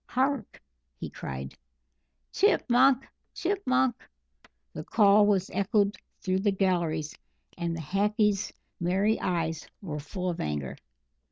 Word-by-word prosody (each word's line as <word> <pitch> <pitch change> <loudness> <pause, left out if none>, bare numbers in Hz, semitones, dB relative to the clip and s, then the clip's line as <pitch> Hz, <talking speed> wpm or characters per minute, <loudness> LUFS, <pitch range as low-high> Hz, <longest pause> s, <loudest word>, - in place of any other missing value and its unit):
"Hark!" 270 +2 -1 0.4
he - - -6
cried. 65 0 -6 0.8
"Chip - - +3
munk 260 +2 +5 0.3
chip 395 +3 -1
munk!" 255 -1 +3 0.8
The - - -6
call 205 -1 +5
was 195 -2 +1
echoed 200 +1 +1 0.3
through 185 0 0
the 205 +2 +2
galleries, 170 -5 0 0.4
and 170 -1 -2
the - - -4
Hackee's 205 +4 +1 0.3
merry 195 +5 +1
eyes 165 -3 -2
were 155 -6 -5
full 180 +5 -3
of 170 - -6
anger. 75 -3 -3
195 Hz, 120 wpm, -28 LUFS, 165-215 Hz, 0.8 s, munk